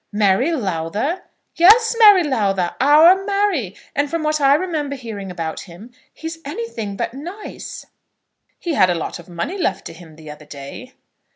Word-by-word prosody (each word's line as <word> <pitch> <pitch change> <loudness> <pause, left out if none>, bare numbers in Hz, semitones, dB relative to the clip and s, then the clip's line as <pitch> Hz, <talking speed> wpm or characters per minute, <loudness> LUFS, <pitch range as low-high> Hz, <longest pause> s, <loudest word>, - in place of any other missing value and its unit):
"Mary 205 - +2
Lowther!" 210 - -2 0.4
"Yes; 450 +7 +6
Mary 410 -5 +8
Lowther! 195 - 0
Our 320 +7 +6
Mary! 395 - -1 0.2
And 285 +1 0
from 330 0 -2
what 305 0 0
I 275 0 +5
remember 305 -4 -2
hearing 220 -7 -7
about 165 -3 -5
him, 195 +8 -13 0.2
he - - -14
is 325 0 -6
anything 230 -6 -5
but 230 - -3
nice." 350 +10 -8 0.7
"He 340 - -3
had 185 -10 +4
a 175 - +1
lot 165 - -5
of 175 - -14
money 175 - -4
left 195 - -1
to - - -8
him 165 -2 -14
the 155 -1 -11
other 150 0 -13
day." 145 - -10
255 Hz, 170 wpm, -19 LUFS, -, 0.7 s, Mary